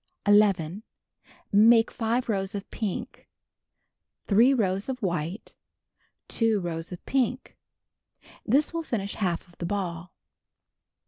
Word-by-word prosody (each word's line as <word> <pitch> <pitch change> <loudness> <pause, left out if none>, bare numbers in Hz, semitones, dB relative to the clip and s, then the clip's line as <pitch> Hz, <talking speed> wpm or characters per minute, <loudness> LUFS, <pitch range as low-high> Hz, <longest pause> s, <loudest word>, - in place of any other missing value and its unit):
11. 200 -3 +3 0.7
Make 225 +2 +6
5 235 +2 -1
rows 195 -2 -2
of 200 - -5
pink. 230 +4 -5 1.0
3 230 +6 +5
rows 200 -4 0
of 260 -1 -3
white. 175 +2 -3 0.7
2 225 -3 +1
rows 165 -1 -5
of 180 - -9
pink. 260 -1 -1 0.9
This 285 +8 +2
will 335 - -1
finish 205 -10 -3
half 180 -3 -2
of 175 - -23
the 170 - -3
ball. 180 -3 -4
205 Hz, 115 wpm, -26 LUFS, 180-235 Hz, 1.0 s, Make